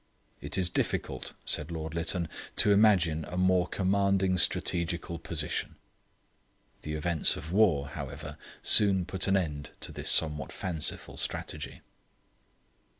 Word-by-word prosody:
'It - - -2
is 95 -2 +1
difficult,' - - -2
said 75 +2 0
Lord 80 -2 -5
Lytton, 85 +1 0 0.3
'to 105 - +4
imagine 95 -7 +4
a 90 - -6
more 90 -1 +3
commanding 95 -1 +1
strategical 85 -1 0
position.' 80 -2 -3 1.1
The 75 - -5
events 80 0 +2
of 80 - -8
the - - -2
war, 80 -10 +3
however, - - -7 0.3
soon 95 -3 +5
put 95 +1 0
an 95 0 +3
end 75 -6 -3
to - - -3
this - - 0
somewhat 75 -2 +1
fanciful 80 -5 -3
strategy. - - -4
85 Hz, 130 wpm, -29 LUFS, 80-95 Hz, 1.1 s, soon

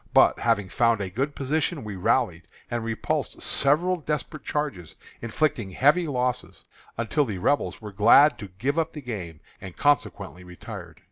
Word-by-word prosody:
But, - - +6
having 110 -4 +1
found 115 +1 +2
a 95 -2 -4
good 135 +8 -2
position, 150 +2 -1
we 105 -2 -6
rallied, 90 - 0 0.2
and 120 -1 -2
repulsed 115 -1 -2
several 170 +7 +2
desperate 155 -1 -4
charges, 145 - -3 0.3
inflicting 115 -2 -1
heavy 150 - +3
losses, 125 -2 -2 0.3
until 120 +6 +1
the 105 -8 -4
Rebels 145 +9 0
were 105 -2 -7
glad 120 +9 +6
to 105 - -6
give 125 - -2
up 165 0 -1
the 150 - -7
game, 90 -10 -6 0.2
and 95 -2 -9
consequently 100 - 0
retired. 90 -1 -10
120 Hz, 155 wpm, -25 LUFS, 100-145 Hz, 0.3 s, But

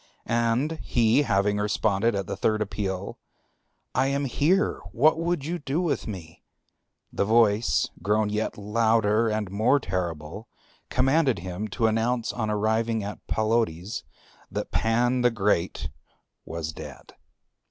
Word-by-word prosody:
And 120 +7 0
he 120 +3 +3
having 105 -5 +1
responded 105 +1 +1
at 100 -1 -2
the - - -4
third 110 -1 +1
appeal, 100 -2 -3 0.7
"I 130 +1 +2
am 140 +1 0
here; 160 - +1
what 155 +6 +3
would 170 -4 -1
you 170 +1 -3 0.2
with 170 -5 -1
me?" 85 -6 -8 0.7
the - - +1
voice, 110 0 +3
grown 105 0 +1
yet 105 +1 -2
louder 110 +1 +2
and 105 -3 -2
more 115 +8 +3
terrible, 90 - -4 0.4
commanded 135 +1 +2
him 90 +4 -5
to 115 +3 -1
announce 115 +2 +1
on 110 -3 -2
arriving 110 +1 0
at 105 +1 -6
Palodes 110 -4 0 0.5
that - - -4
Pan 120 +3 +2
the 125 - +5
Great 100 -5 0 0.6
was 80 -1 -4
dead. - - -10
110 Hz, 130 wpm, -26 LUFS, 100-120 Hz, 0.7 s, the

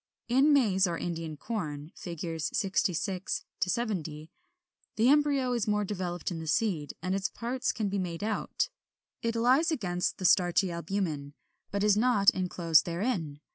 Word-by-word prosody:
43. 245 - +2
In 300 - +6
Maize 200 -9 +4
or 170 -1 -2
Indian 165 -3 -4
Corn 155 -8 -4
(Fig. 165 -2 -5
66 190 -1 -1 0.2
70), 175 -7 -3 0.6
the 230 +3 +4
embryo 285 -3 +3
is 235 -3 -1
more 210 0 +2
developed 185 -3 -3
in 165 - -4
the 160 - -6
seed, 160 -5 0
and 185 0 0
its 195 +1 -1
parts 250 +3 -2
can 215 -3 -2
be 200 0 -1
made 175 -1 -4
out. 215 0 -1 0.5
It 230 0 -1
lies 255 +8 +4
against 180 - -1
the 185 - -4
starchy 180 +1 +4
albumen, 170 -5 -3 0.3
but 200 0 -1
is 210 -1 +5
not 215 -3 +4
enclosed 175 -3 +2
therein. 170 - -2
190 Hz, 155 wpm, -29 LUFS, 170-225 Hz, 0.6 s, In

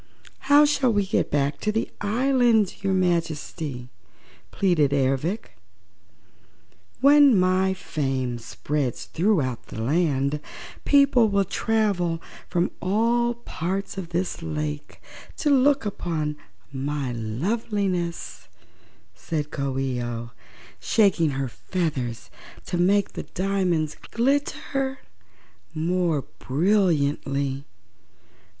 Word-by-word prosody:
"How 290 +1 +8
shall 275 -4 +2
we 205 -2 +1
get - - 0
back 140 0 0
to 215 - 0
the 220 +1 -1
island, 235 -1 +2
your 195 - +1
Majesty?" 160 -7 -2 0.6
pleaded 160 -8 +2
Ervic. 140 - -1 1.5
"When 280 -5 +7
my 185 +1 +2
fame 135 -8 -2
spreads 130 +2 -3
throughout 155 - 0
the - - -7
land, 140 +2 +1 0.5
people 280 -5 +5
will 200 -1 +2
travel 200 -5 0 0.3
from 175 0 0
all 230 +6 +1
parts 195 -4 -4
of 185 -4 -6
this 175 0 -2
lake 150 -2 -5 0.4
to 295 - +1
look 275 -1 +4
upon 160 -7 -2 0.4
my 140 -1 -2
loveliness," 170 - -2 0.7
said 150 - -4
Coo 140 -2 -2
ee 130 -2 -1
oh, 120 -1 -5 0.5
shaking 185 -7 +3
her 135 -1 -1
feathers 130 -4 -3 0.3
to 175 - -2
make 200 +3 +2
the - - -4 0.2
diamonds 180 -5 0 0.2
glitter 270 +1 0 0.8
more 165 -2 0 0.2
brilliantly. 140 -5 +1
175 Hz, 100 wpm, -24 LUFS, 140-205 Hz, 1.5 s, How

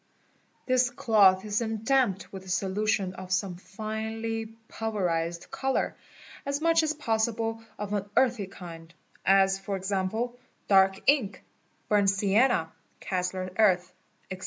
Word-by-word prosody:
This 255 -1 +3
cloth 205 -6 +4
is 210 0 0
then 220 -2 -3
damped 240 -8 +1
with 190 -1 -7
a 190 - -12
solution 195 0 0
of 185 0 -9
some 185 -1 0
finely 220 +4 -4 0.2
pul 225 0 -4
yerized 170 -3 -2
colour, 270 0 -1 0.5
as 280 0 -2
much 330 +1 +4
as 310 -1 -1
possible 225 -3 -1
of 210 0 -4
an 205 -1 -2
earthy 240 -6 +2
kind, 165 -3 -10 0.4
as 195 0 +4
for 195 0 -4
example 200 +6 -2 0.3
dark 190 -1 +4
» - - -28
ink, 265 -9 +2 0.4
burnt 205 -2 +3
sienna, 200 -2 +2 0.3
Kassler 185 0 -3
Earth, 180 -4 +3 0.4
etc. 185 - -5
205 Hz, 135 wpm, -28 LUFS, 190-225 Hz, 0.5 s, cloth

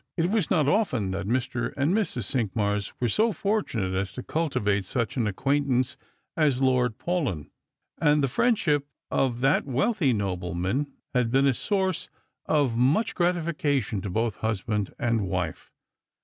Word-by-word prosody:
It 170 +2 +1
was 215 -7 +1
not 155 -6 +3
often 130 - +1
that 95 +1 -3
Mr. 125 0 -1
and 140 +5 +2
Mrs. 210 -5 0
Cinqmars 105 -5 -1
were 125 - +1
so 220 - +2
fortunate 195 - -1
as 95 0 -1
to 125 - -6
cultivate 105 -11 0
such 115 +3 -2
an 120 -5 +1
acquaint 140 +8 0
ance 130 0 +1 0.4
as 145 -5 +2
Lord 125 -4 +2
Paulyn, 140 - -2 0.5
and 150 -2 +3
the - - +3
friendship 150 - +1 0.2
of 125 -2 +1
that 135 +2 +2
wealthy 140 - +1
nobleman 95 - -1 0.3
had 125 -3 +2
been 135 +3 +3
a 135 - +4
source 190 - -1 0.4
of 145 -6 +2
much 135 - +2
gratification 155 - 0
to 100 - -4
both 110 +2 -1
husband 105 -1 -1
and 115 -6 0
wife. 90 -4 -3
130 Hz, 150 wpm, -26 LUFS, 105-150 Hz, 0.5 s, a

